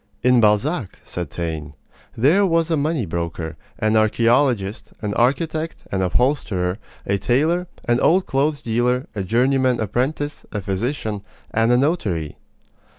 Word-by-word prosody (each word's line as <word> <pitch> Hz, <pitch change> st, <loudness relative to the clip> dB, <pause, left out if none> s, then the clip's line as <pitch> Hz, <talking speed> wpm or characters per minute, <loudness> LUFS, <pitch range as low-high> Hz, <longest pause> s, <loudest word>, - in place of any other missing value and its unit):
"In 125 Hz, -1 st, +5 dB
Balzac," 110 Hz, -, +1 dB
said 85 Hz, -4 st, -5 dB
Taine, 80 Hz, -3 st, -5 dB, 0.4 s
"there 150 Hz, -, +4 dB
was 165 Hz, -3 st, +2 dB
a -, -, +4 dB
money 150 Hz, -4 st, 0 dB
broker, 85 Hz, -1 st, -4 dB, 0.2 s
an 110 Hz, 0 st, +1 dB
archeologist, 115 Hz, -1 st, +2 dB
an 105 Hz, -1 st, -1 dB
architect, 155 Hz, +7 st, 0 dB, 0.2 s
an 95 Hz, -, 0 dB
upholsterer, 95 Hz, -3 st, 0 dB, 0.3 s
a 100 Hz, 0 st, 0 dB
tailor, 155 Hz, -, +1 dB, 0.2 s
an 120 Hz, 0 st, +3 dB
old 185 Hz, +3 st, +3 dB
clothes 145 Hz, +2 st, 0 dB
dealer, 120 Hz, +3 st, +1 dB
a 105 Hz, -, -3 dB
journeyman 125 Hz, +4 st, +2 dB
apprentice, 135 Hz, +7 st, -2 dB
a 105 Hz, -, -2 dB
physician, 105 Hz, +2 st, -2 dB, 0.3 s
and 115 Hz, +2 st, +2 dB
a 120 Hz, -, +5 dB
notary." 105 Hz, -, 0 dB
120 Hz, 135 wpm, -21 LUFS, 100-145 Hz, 0.4 s, In